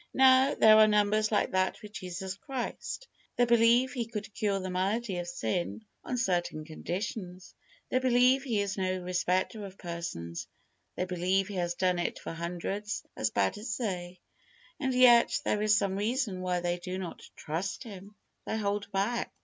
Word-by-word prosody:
Now, 265 +1 +6
there 215 0 +7
are 215 0 +8
numbers 210 +1 +2
like 210 - +1
that 185 0 +1
with 210 - -9
Jesus 185 -2 -5
Christ. 265 - -5 0.3
They 245 - +4
believe 235 +2 +4
He 235 -4 -2
could 215 -2 -6
cure 200 -3 0
the 185 -1 -4
malady 195 +2 -1
of 175 - -4
sin 110 - -3 0.2
on 250 - -3
certain 175 -8 -1
conditions. 180 +3 -5 0.4
They 255 - +3
believe 255 +1 +4
He 235 -6 0
is 200 0 -3
no 185 0 0
respecter 185 +3 -1
of 195 -1 -9
persons. 170 - -5 0.5
They 180 - -1
believe 185 +2 +1
He 205 - -6
has 175 -1 -1
done 180 -1 +1
it 175 - -2
for - - -6
hundreds 180 +5 -4
as 110 - 0
bad 100 - 0
as 220 +1 -3
they, 180 -6 -4 0.6
and 265 -2 0
yet 240 -2 +6
there 210 - +1
is 215 0 +4
some 200 -2 0
reason 210 -2 -1
why 180 -1 -1
they 175 0 -1
do 180 +1 -5
not 185 -3 -6
trust 170 +9 -4
Him. 205 -2 -11 0.3
They 220 - -1
hold 205 -1 -2
back. 200 +5 -1
195 Hz, 175 wpm, -30 LUFS, 180-220 Hz, 0.6 s, are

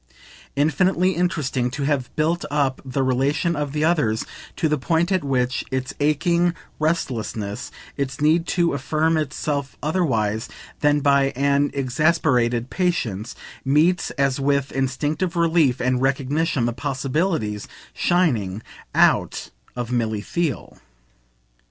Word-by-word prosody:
Infinitely 175 +6 +2
interesting 155 -8 0
to 140 +3 -4
have 140 -3 0
built 165 +3 +1
up 140 -3 0
the 135 0 -1
relation 135 +6 +1
of 145 -2 -2
the 150 +1 -1
others 150 -10 +1 0.3
to 160 - +1
the 150 -1 0
point 165 +8 +1
at 185 -4 +1
which 125 -2 0
its 130 -1 -3
aching 170 +4 +2 0.2
restlessness, 120 -8 -2 0.3
its 140 -1 -3
need 160 +3 +3
to 170 -2 +1
affirm 155 +4 +1
itself 145 -2 -2
otherwise 115 - 0 0.3
than 145 -1 +3
by 140 -1 +4
an 140 +1 +2
exasperated 130 -3 +1
patience, 120 - -1 0.3
meets 160 +6 +3
as 140 -1 +1
with 140 0 +1
instinctive 145 +6 -1
relief 165 -6 +3
and 125 0 +1
recognition 135 0 +1
the 120 - 0
possibilities 135 - -1 0.3
shining 115 - +1 0.3
out - - +2 0.2
of 120 -1 -4
Milly 110 -4 0
Theale. 170 -2 -3
140 Hz, 120 wpm, -22 LUFS, 125-160 Hz, 0.3 s, by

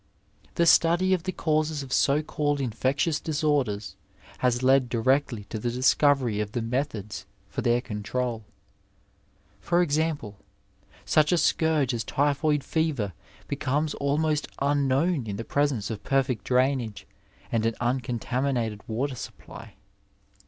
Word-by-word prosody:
The 170 - +3
study 170 +3 +4
of 185 - +1
the 185 - -1
causes 155 -3 0
of 135 - -6
so 145 +2 +3
called 145 -2 -1
infectious 135 +5 0
disorders 145 -10 -1 0.4
has 125 0 +1
led 130 -1 +4
directly 125 -1 +1
to 110 - -3
the 120 - -1
discovery 130 -2 +2
of 105 0 -3
the 120 - -1
methods 115 -4 -3 0.2
for - - -3
their 120 0 +2
control, 115 +1 -3 1.2
for 175 0 +1
example, 145 - -1 0.7
such 150 -1 +3
a 175 - +4
scourge 155 -4 +2
as 115 -2 -2
typhoid 145 +3 +1
fever 145 - -1 0.3
becomes 145 +4 -1
almost 150 +2 0
unknown 140 +1 +1
in 100 - -3
the 115 +3 -5
presence 135 -6 0
of 105 -2 -6
perfect 130 -6 0
drainage 125 -4 0 0.5
and 115 -1 +1
an 115 - -1
uncontaminated 120 -2 -1
water 130 +5 -2
supply. 125 - -10
135 Hz, 130 wpm, -26 LUFS, 115-150 Hz, 1.2 s, study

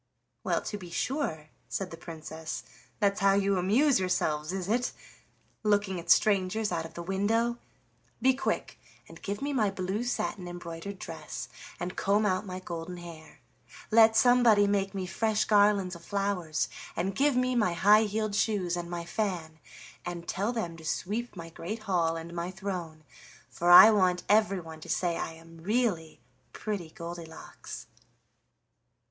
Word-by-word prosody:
"Well - - 0
to 210 - -5
be 180 -3 -9
sure," 170 - -2 0.2
said 195 -2 -3
the - - -6
Princess, 160 -1 -7 0.4
"that's 200 -2 +2
how 195 0 +4
you 200 -1 +2
amuse 240 +8 +3
yourselves, 160 -4 0
is 190 -1 -3
it? 240 +4 0 0.7
Looking 205 -3 +1
at 170 - -10
strangers 205 +1 +3
out 165 -2 -1
of 165 - -11
the 170 - -5
window! 225 +6 0 0.6
Be 260 +2 +4
quick 265 - -3 0.3
and - - -13
give 205 +5 -4
me 285 0 -1
my 220 -6 +2
blue 195 +3 -2
satin 205 -6 -2
embroidered 175 +2 -7
dress, - - -7 0.3
and 180 +1 -4
comb 205 +2 +2
out 185 0 0
my 185 0 -5
golden 175 -1 -6
hair. 165 -2 -11 0.5
Let 225 0 +7
somebody 235 -3 +6
make 200 -1 0
me 190 -1 -2
fresh 215 +3 0
garlands 205 -3 +4
of 170 -1 -10
flowers, 195 -6 -1 0.3
and 190 +3 -1
give 280 +5 +2
me 255 0 +2
my 210 -7 +2
high 205 +5 +5
heeled 215 0 -2
shoes 200 -5 +1
and 175 -1 -5
my 170 -1 -4
fan, 170 -5 -3 0.4
and 175 -1 -6
tell 200 +5 -1
them 175 -9 -3
to 160 - -12
sweep 210 +9 -3
my 165 -2 -8
great 215 +7 -6
hall 175 -5 +1
and 165 +1 -7
my 170 +1 -3
throne, 180 -5 -5 0.5
for 175 - 0
I 195 +5 +11
want 185 -4 +2
everyone 195 -7 +1
to - - -11
say 175 -2 0
I 165 - -4
am 165 0 -15
really 195 -4 -1 0.3
'Pretty 200 -7 -4
Goldilocks. 170 -1 -9
190 Hz, 160 wpm, -29 LUFS, 170-210 Hz, 0.7 s, I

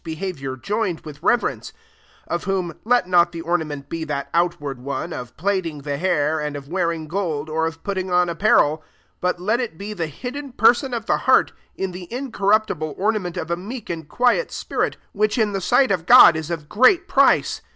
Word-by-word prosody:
3 160 -1 -6 2.1
Of 170 - -3
whom, 185 -3 -1
let 240 -4 +2
not 175 -1 +4
the 170 -1 -6
ornament 160 -4 -2
be 165 +2 -4
that 140 -2 -4
outward 150 -6 -1
one, 140 +6 -4
of 125 -1 -8
plaiting 170 -4 -2
the 145 -1 -3
hair, 155 -2 +1
and 150 -1 -3
of 140 -1 -8
wearing 170 -2 -2
gold, 160 -4 -3
or 160 +1 0
of 165 0 -8
putting 190 -2 -3
on 180 0 +3
apparel; 170 -3 +3
4 155 - -28 0.4
but 180 -1 0
let 215 +6 0
it 235 -10 -4
de 205 +3 -6
the 170 -5 -3
hidden 255 - -7
person 245 +3 +3
of 225 -2 -4
the - - +2
heart, - - +3 0.2
in 190 -1 -3
the 180 +1 -9
incorruptible 215 - 0
ornament 200 -4 -1
of 160 - -4
a - - +2
meek 205 +4 -7
and 160 -3 -6
quiet 250 - +1
spirit, - - -2
which 210 +2 0
in 215 -3 +1
the 195 - -2
sight 245 +4 +3
of 175 -4 -1
God 245 -9 +9
is 160 0 -4
of 160 -3 -5
great 255 - +4
price. - - +3
175 Hz, 185 wpm, -22 LUFS, 160-210 Hz, 2.1 s, God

